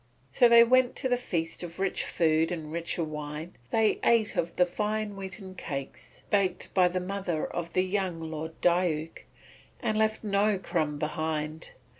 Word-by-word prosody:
So 240 - +5
they 235 0 +9
went 255 +1 +3
to 265 - -1
the 250 - +4
feast 170 -9 -3
of 170 -1 -7
rich 195 0 -1
food 160 0 +2
and 160 -3 -5
richer 170 +1 -2
wine, 150 +1 -6
and - - -31 0.2
they 220 -1 +3
ate 230 -3 +3
of 170 0 -1
the 180 - +4
fine 210 +3 -2
wheaten 190 0 -7
cakes 140 -7 -7
baked 190 -3 +1
by 185 -2 +5
the 180 +1 -1
mother 180 -3 -2
of 170 -1 -5
the 185 - +3
young 185 -3 -1
Lord 160 0 -6
Diuk, 170 -3 +1 0.5
and 215 -3 0
left 220 +1 +1
no 205 0 +2
crumb 155 -5 -1
behind. 155 0 -3
180 Hz, 170 wpm, -28 LUFS, 160-205 Hz, 0.5 s, they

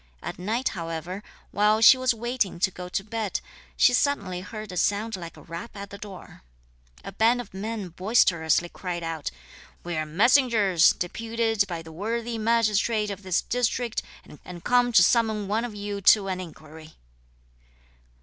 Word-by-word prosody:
At - - -6
night, 225 +8 -1
however, 165 +3 -5 0.3
while 210 +1 +3
she 225 +4 +9
was 255 0 +1
waiting 235 -4 -2
to 190 - +3
go 180 -1 -8
to 195 - -2
bed, 215 -1 -3 0.4
she 250 - +5
suddenly 200 -10 0
heard 215 +1 -8
a - - -7
sound 210 +4 0
like 170 -3 -9
a - - -13
rap 170 +6 -8
at 200 0 -8
the 200 - -9
door. 200 -3 -11 0.6
A - - -7
band 230 +3 +3
of 235 -6 -8
men 205 0 -4
boisterously 175 -3 +2
cried 175 -1 -5
out: 165 -2 -3 0.5
"We 175 -1 -4
are 155 0 -2
messengers, 210 - +4
deputed 225 +2 -1
by 170 -2 -5
the 160 - -11
worthy 225 +6 -3
magistrate 215 -1 +1
of 200 0 -7
this 185 -2 0
district, 245 -1 -1 0.4
and 175 -2 -10
come 245 0 +3
to 190 -6 +7
summon 220 -1 +2
one 215 +3 0
of 230 -3 -7
you 205 0 -5
to 195 +1 +5
an 185 -1 -2
enquiry." 160 -2 -12
205 Hz, 165 wpm, -26 LUFS, 180-230 Hz, 0.6 s, she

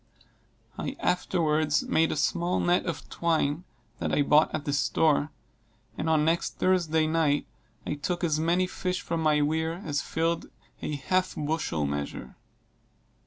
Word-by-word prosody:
I - - -3
afterwards 155 -4 +1
made 160 0 +2
a - - -1
small 175 +4 0
net 175 +1 +2
of 170 - -4
twine 165 -1 0 0.3
that - - -2
I 145 - +3
bought 150 +2 +5
at 155 -1 -4
the 145 - -1
store; 150 +1 +2 0.7
and 160 - -2
on 155 -1 +3
next 165 +1 0
Thursday 165 -4 +2
night 155 -2 +1 0.4
I - - -1
took 175 +4 -3
as 155 -3 +1
many 170 +3 +2
fish 185 0 -3
from 165 -1 -2
my 150 -2 +3
weir 160 +2 0
as 145 -2 -1
filled 165 +1 -1 0.3
a 150 - -3
half 185 +6 0
bushel 145 - -1
measure. 70 -2 -4
160 Hz, 150 wpm, -27 LUFS, 150-170 Hz, 0.7 s, bought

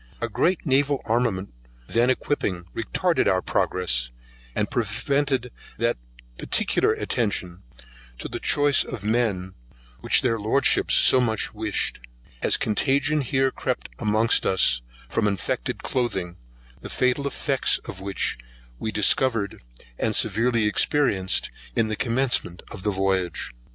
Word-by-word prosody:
A - - -2
great 180 0 0
naval 140 0 +1
armament 110 - -1 0.3
then 120 - +1
equipping 100 -9 -1
retarded 170 - 0
our 95 -1 +2
progress, 65 -10 0 0.5
and - - -1
prevented 140 -3 -1 0.3
that 115 0 +1 0.4
particular - - +2
attention 95 -5 -2 0.6
to - - -6
the - - -6
choice 145 -1 +3
of 110 -6 -7
men 105 -5 -1 0.5
which - - +3
their 115 -3 +1
Lordships 110 +5 +2
so 130 - +7
much 110 -3 -1
wished; 110 -1 -1 0.4
as - - +3
contagion 140 +7 +1
here 135 +1 +1
crept 125 -1 -4
amongst 110 +1 +2
us - - +3 0.3
from 110 -2 0
infected 95 -11 -3
clothing, 95 -9 -2 0.5
the - - -8
fatal 130 +2 0
effects 140 0 +1
of 95 - -8
which 95 -9 -2 0.4
we 110 - -2
discovered, 105 0 +1 0.4
and 110 -2 0
severely 115 +2 +1
experienced, 105 -3 +2 0.2
in 115 -1 +1
the 110 - -1
commencement 115 -7 0
of 95 - -7
the 105 - -1
voyage. 95 -2 -1
115 Hz, 125 wpm, -24 LUFS, 95-130 Hz, 0.6 s, so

